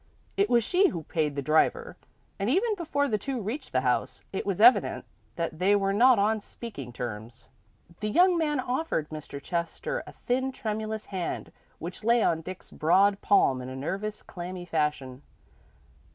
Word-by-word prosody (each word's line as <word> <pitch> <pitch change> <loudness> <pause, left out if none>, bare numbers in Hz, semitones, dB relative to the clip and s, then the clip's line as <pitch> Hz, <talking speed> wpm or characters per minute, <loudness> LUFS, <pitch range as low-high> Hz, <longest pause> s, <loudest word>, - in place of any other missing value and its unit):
It 400 +1 +2
was 235 -1 +4
she 370 - +4
who 170 -4 -4
paid 150 -2 -1
the 140 - -2
driver, 315 - +2 0.4
and 200 +3 0
even 415 - +2
before 305 -7 -1
the 215 -5 0
two 270 +1 -3
reached 245 +7 -5
the 130 - +2
house, 125 -1 -1
it 195 - -3
was 195 -2 -1
evident 240 +4 +5 0.3
that 165 -1 -3
they 195 +3 +4
were 195 -1 +1
not 245 +4 +6
on 215 +2 +2
speaking 200 - -8
terms. 120 0 -7 0.5
The 215 - -2
young 355 - +5
man 300 -4 0
offered 255 - -1
Mr. 150 -2 -7
Chester 170 - -3
a - - -8
thin, 260 +2 -1
tremulous 220 -1 -4
hand 185 -3 -4 0.3
which 175 +5 -7
lay 235 +1 +4
on 165 -1 +1
Dick's 185 +3 -9
broad 195 +5 +3
palm 135 -10 +3
in 125 - -7
a 130 - -7
nerveless, 195 +10 -4
clammy 180 0 -7
fashion. 150 -5 -2
200 Hz, 170 wpm, -28 LUFS, 155-250 Hz, 0.5 s, not